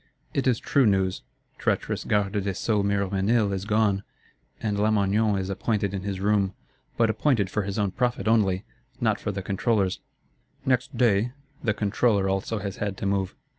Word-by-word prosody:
It 135 -1 0
is 125 -3 +3
true 135 +1 +2
news. 95 -2 +1 0.4
Treacherous - - -1
Garde 105 0 +1
des 100 -1 -2
Sceaux 105 +1 +1
Miroménil 100 +2 +1
is 95 0 -3
gone, 105 -2 +2 0.6
and 105 -2 -1
Lamoignon 105 0 +2
is 95 -1 -2
appointed 100 0 -1
in 95 - -3
his 95 -1 -3
room: 100 -1 +1 0.4
but 115 -1 +4
appointed 110 -4 +1
for 105 - 0
his 100 0 -4
own 100 -2 +1
profit 125 0 -1
only, 100 -4 +2 0.3
not - - +1
for - - -2
the 95 -1 -5
Controller's: 100 -1 0 0.7
"next 130 -1 0
day" 115 0 +3 0.3
the 110 -5 +1
Controller 105 -1 +2
also 95 +3 -1
has 100 -2 -5
had 100 -2 -3
to - - -4
move. 100 -1 0
100 Hz, 170 wpm, -26 LUFS, 95-110 Hz, 0.7 s, but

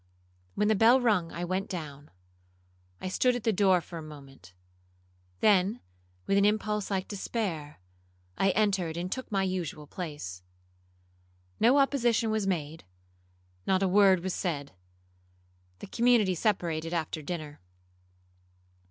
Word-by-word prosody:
When 210 - +1
the 220 - +4
bell 225 +5 +5
rung 205 -9 +1
I 175 +1 -4
went 185 +2 -2
down. 150 -5 -7 0.9
I - - -5
stood 250 +6 +2
at 245 - -4
the 225 - +2
door 190 -2 +4
for 170 0 -8
a - - -7
moment,—then, 90 - -3 0.5
with 200 - +3
an - - +3
impulse 210 0 0
like 190 -2 -2
despair, 185 - -4 0.6
I 195 - +2
entered 190 -5 +1
and 180 +2 -4
took 260 -3 -5
my 195 -2 +1
usual 180 -5 -3
place. 145 - -7 1.2
No 245 +5 +5
opposition 240 -5 +2
was 215 -2 0
made,—not 90 - -5
a - - +3
word 190 -1 +5
was 190 -1 -2
said. 145 -6 -3 1.1
The - - -9
community 230 -3 +3
separated 170 -4 -1
after 160 -1 -3
dinner. 155 -2 -6
180 Hz, 125 wpm, -29 LUFS, 145-210 Hz, 1.2 s, bell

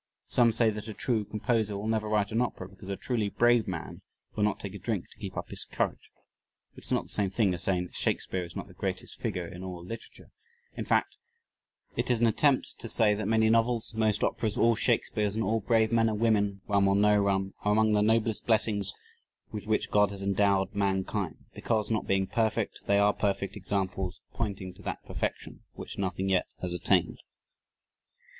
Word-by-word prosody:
Some 120 -2 +4
say 115 0 +3
that 105 +1 -6
a 110 - -6
true 115 -4 0
composer 105 0 -1
will 100 - -5
never 110 -1 0
write 105 -1 +1
an 115 +2 +1
opera 105 -6 -3
because 95 0 -12
a 100 - -1
truly 115 -5 -1
brave 120 +1 +3
man 90 -4 -5 0.3
will 105 - 0
not 105 - +1
take 100 -2 -6
a 100 - -7
drink 105 -1 -2
to - - -17
keep - - -6
up - - -5
his - - 0
courage; - - -3 0.6
which - - -12
is - - -7
not - - +2
the - - -14
same 100 -2 +1
thing 95 0 +2
as 85 - -4
saying 90 -2 +1
that - - -14
Shakespeare 95 -1 -1
is 85 0 -10
not - - -5
the - - -14
greatest - - -4
figure 90 -1 -2
in 90 +2 -9
all 90 -2 -7
literature; 115 +5 -9 0.4
in - - -4
fact, - - +1 0.8
it - - -1
is 120 -2 +3
an 120 - +4
attempt 130 +4 +2
to 115 - -5
say 110 -2 +4
that 105 -1 -2
many 110 0 +3
novels, 115 0 +3
most 110 -2 +1
operas, 110 0 0
all 115 0 +5
Shakespeares, 105 -2 +1
and 110 - 0
all 110 +3 +1
brave 110 +1 +2
men 115 -1 +3
and 105 -1 -2
women 105 -4 +2
(rum 100 -1 +3
or 95 - +3
no 105 0 +4
rum) 95 -1 0
are 105 - +2
among 110 0 +3
the 105 - +3
noblest 110 0 +1
blessings 105 -3 +1 0.6
with 105 0 -6
which 110 - 0
God 105 -1 +4
has 100 -1 -6
endowed 100 0 +2
mankind 95 -4 -1
because, 110 -1 -1
not 110 - -1
being 95 0 +2
perfect, 110 +2 -1
they 100 - +4
are 100 0 +4
perfect 100 -1 -1
examples 95 -2 -2
pointing 100 -5 -3
to - - -16
that - - -5
perfection - - -4
which - - -8
nothing 95 0 -1
yet 95 -2 +2
has 90 -1 -2
attained. 90 - +1
105 Hz, 205 wpm, -29 LUFS, 95-110 Hz, 0.8 s, all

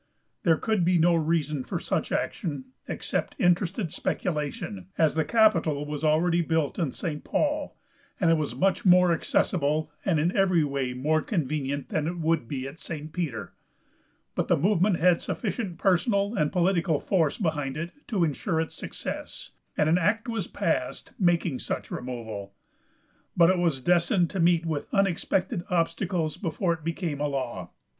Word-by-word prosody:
There 165 -2 +3
could 215 -2 0
be 180 +1 +3
no 170 +1 +4
reason 155 -4 0
for - - -3
such - - -2
action 170 - -2 0.2
except - - -3
interested 180 0 +1
speculation, 145 - -3
as 160 -2 +3
the 160 - +1
capitol 165 -6 +3
was 150 0 -5
already 165 +3 +3
built 160 -2 0
in 160 -7 0
St. 150 -1 -4
Paul, 300 0 -1 0.4
and 165 -4 +4
it - - +6
was 155 -2 -1
much 195 0 +1
more 180 -2 +6
accessible, 155 -2 0
and 170 -6 +2
in 170 +5 +1
every 185 -4 +3
way 135 -3 -2
more 155 +5 +1
convenient 145 - -2
than 155 -1 -1
it 175 +1 -3
would 165 -6 0
be 130 0 -4
at 140 +4 -10
St. 155 -1 -6
Peter; 150 -11 -4 0.8
but - - -1
the - - +3
movement 190 +2 +2
had 175 0 +4
sufficient 200 -5 -3
personal 200 +2 +2
and 150 -9 +1
political 175 -4 +2
force 165 -7 +1
behind 150 -7 -1
it 170 +2 -4 0.2
to 200 -7 +1
insure 160 +2 0
its 160 - -3
success, - - -6 0.3
and 150 - +3
an 165 +3 +4
act 220 +7 +1
was 225 -5 -2
passed - - -2
making 175 -7 +2
such - - -4
removal. 110 -6 -6 0.8
But 170 +1 +7
it 185 - +1
was 165 -6 +1
destined 175 +3 +2
to 195 - -3
meet 170 0 +3
with 155 -3 -2
unexpected 195 0 +1
obstacles 165 -2 0
before 170 +2 -1
it 160 -2 -8
became 165 -2 -3
a 150 - +1
law. 125 -10 -4
165 Hz, 165 wpm, -27 LUFS, 150-180 Hz, 0.8 s, But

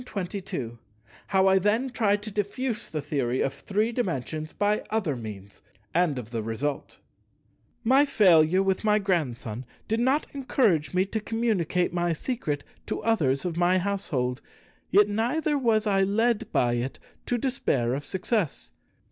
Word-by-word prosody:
§ - - -12
22 180 - -5 0.5
How 190 -1 +3
I 190 0 +5
then 220 +7 +1
tried 205 -4 +1
to 215 - -5
diffuse 215 +3 -2
the 155 -2 -4
Theory 130 -4 -1
of 135 - 0
Three 210 +11 -1
Dimensions 155 - -3
by 210 +1 0
other 195 -10 0
means, 100 -4 -9 0.3
and 170 -5 +2
of 115 -2 -7
the 115 -2 -2
result 120 +6 -3 0.9
My 265 +4 +5
failure 185 - +5
with 190 +1 0
my 210 -1 +4
Grandson 130 - -1 0.2
did 225 +1 0
not 265 +5 +2
encourage 230 - +1
me 185 +1 +3
to 220 +3 -3
communicate 205 -6 0
my 175 -1 +1
secret 155 - -3 0.2
to - - -3
others 155 -11 +1
of 170 -2 -2
my 175 +1 +3
household; 175 -10 -1 0.5
yet 205 +1 +5
neither 250 +9 0
was 230 -5 +2
I 195 -2 +2
led 220 +3 +1
by 120 -1 +2
it 125 +2 -3 0.3
to 245 - +1
despair 180 - 0
of 140 +2 -3
success. 190 - -2
190 Hz, 155 wpm, -26 LUFS, 145-220 Hz, 0.9 s, I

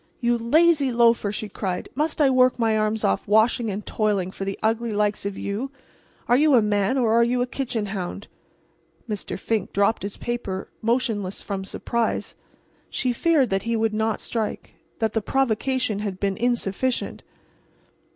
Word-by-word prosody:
"You 240 -1 +2
lazy 285 +4 +3
loafer!" 235 -3 +3
she 215 +1 -4
cried, 190 -3 -4
"must 305 +5 -1
I 280 -3 +5
work 255 0 +4
my 225 -2 +2
arms 215 0 0
off 95 - +1
washing 220 +2 +3
and 205 +1 -4
toiling 205 -4 0
for 195 - -5
the 195 0 -3
ugly 225 +2 +1
likes 210 -1 0
of 200 - -5
you? 210 +7 -3 0.6
Are 240 - +5
you 295 +1 +5
a 235 - +6
man 205 +3 +1
or 230 -4 +2
are 235 +1 +5
you 245 +1 +1
a - - -1
kitchen 245 -4 -3
hound?" 195 0 -5 0.8
Mr. 210 -3 -4
Fink 215 0 -2
dropped 200 +3 +2
his 200 0 -5
paper, 225 -6 -4
motionless 220 -5 -1
from 195 -2 -4
surprise. 230 +4 -2 0.6
She 255 -2 -1
feared 295 - +2
that 195 0 +1
he 230 +3 -1
would 225 -1 +1
not 220 0 0
strike—that 220 0 -4
the 225 - +1
provocation 255 -2 0
had 200 -3 -4
been 195 -1 0
insufficient. 240 +1 -1
225 Hz, 165 wpm, -24 LUFS, 205-245 Hz, 0.8 s, a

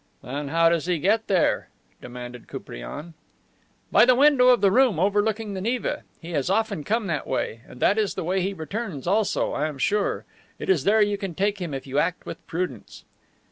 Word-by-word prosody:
"Then 140 +3 -4
how 165 +3 +3
does 170 0 0
he 180 -2 +1
get 210 +8 +1
there?" 185 -4 +1 0.3
demanded 125 0 -9
Koupriane. - - -8 0.8
"By - - +7
the 250 +1 +6
window 275 -2 +5
of 250 -2 +6
the 195 - +4
room 245 -7 +4
overlooking 205 +2 +1
the 190 - -4
Neva. 235 +4 -1 0.2
He 170 +1 -9
has 145 -1 -1
often 200 -5 0
come 220 +6 0
that 155 -6 -2
way. 115 - -2
And 125 - -13
that 210 - +3
is 210 -2 0
the - - -3
way 185 +3 0
he 190 +2 -1
returns 185 - -5
also, 205 +4 +1
I 150 +2 -1
am 150 -3 -6
sure. 205 +9 0 0.3
It - - -6
is 160 -7 +1
there 215 +1 +5
you 205 -1 -1
can 190 -4 -5
take 200 +2 0
him 170 -3 -3
if 135 -1 -5
you 135 +1 -1
act 165 +3 -1
with - - -8
prudence." 165 - -5
185 Hz, 205 wpm, -24 LUFS, 150-210 Hz, 0.8 s, By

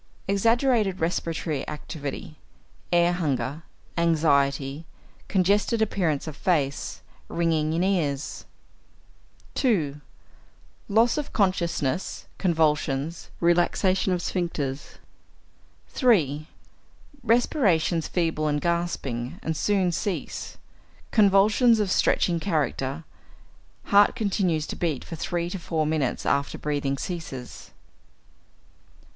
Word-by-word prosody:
Exaggerated 225 0 +2
respiratory 165 -3 -2
activity; 150 0 -6 0.6
air 175 0 +4
hunger; 150 -3 -2 0.4
anxiety; 145 -2 +1 0.4
congested 200 +4 +2
appearance 180 -9 0
of 155 -3 -6
face; 145 -6 -1 0.2
ringing 160 -2 0
in 170 +2 +1
ears. 155 -8 -1 1.1
2. 155 - 0 0.9
Loss 230 +7 +3
of 295 - -5
consciousness; 180 - 0
convulsions; 155 -3 0
relaxation 175 +3 +2
of 180 -1 0
sphincters. 150 -6 -3 0.9
3. 155 - +2 0.7
Respirations 195 - +2
feeble 165 -3 0
and 145 -1 +1
gasping, 150 -8 -2
and 160 - -1
soon 190 +1 +1
cease; 175 +3 -4 0.5
convulsions 215 +3 +5
of 205 -3 0
stretching 170 -2 +2
character; 150 -4 -1 0.8
heart 205 0 +5
continues 190 -9 0
to - - -5
beat 160 -6 -2
for 165 - -6
three 170 +1 -2
to 180 +2 -5
four 160 -2 -1
minutes 150 -5 -1
after 140 0 0
breathing 145 -2 -1
ceases. 140 -7 -6
170 Hz, 95 wpm, -25 LUFS, 150-195 Hz, 1.1 s, convulsions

